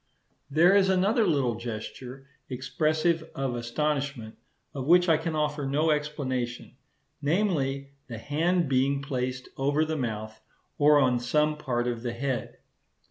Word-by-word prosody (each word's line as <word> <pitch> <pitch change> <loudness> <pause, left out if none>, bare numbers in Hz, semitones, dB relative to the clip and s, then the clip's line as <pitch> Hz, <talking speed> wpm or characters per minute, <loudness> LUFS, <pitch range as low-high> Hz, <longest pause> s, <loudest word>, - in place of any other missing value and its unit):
There 170 +7 +5
is 195 -1 +4
another 200 +4 +3
little 140 -7 +1
gesture, 120 +4 -7 0.2
expressive 155 +5 0
of 135 -2 -2
astonishment 135 -1 -2 0.4
of 135 -1 -5
which 180 +2 +6
I 165 - +5
can 160 +1 -2
offer 150 -1 -1
no 150 +4 +2
explanation; 130 -6 -3 0.5
namely, 140 -5 0 0.2
the 115 -3 -6
hand 165 +7 0
being 135 +1 +1
placed 130 -2 -3
over 145 +3 +1
the 160 0 -2
mouth 110 -3 -4 0.4
or 150 0 +6
on 125 -3 +3
some 150 +5 +1
part 125 -5 -2
of 120 -2 -2
the 120 -1 -3
head. 130 0 -3
140 Hz, 135 wpm, -27 LUFS, 125-155 Hz, 0.5 s, which